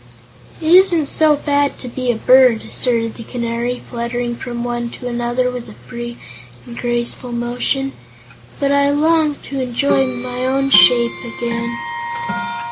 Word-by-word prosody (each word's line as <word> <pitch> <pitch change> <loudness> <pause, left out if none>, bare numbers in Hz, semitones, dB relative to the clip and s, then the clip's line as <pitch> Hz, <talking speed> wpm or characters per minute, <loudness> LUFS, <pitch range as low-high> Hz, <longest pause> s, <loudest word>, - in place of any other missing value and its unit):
"It 320 +1 +1
isn't 360 -4 +6
so 305 +1 +4
bad 285 -1 0
to 255 - -8
be 250 0 -2
a - - -3
bird," 250 0 +4
asserted 230 -3 +2
the 230 - -10
Canary, 235 +1 -3
fluttering 240 0 -3
from 240 0 -6
one 240 0 -3
to 250 - -8
another 240 +1 -1
with 250 -1 -7
a - - -11
free 240 -1 -8 0.5
and 235 - -10
graceful 240 +1 -2
motion, 245 +3 -2 0.7
"but 280 -1 +1
I 280 0 +3
long 305 +1 +2
to 275 -1 -4
enjoy 265 +2 +1
my 250 +1 -4
own 275 +1 0
shape 235 +5 +6 0.2
again." 235 0 -3
245 Hz, 145 wpm, -17 LUFS, 240-275 Hz, 0.7 s, isn't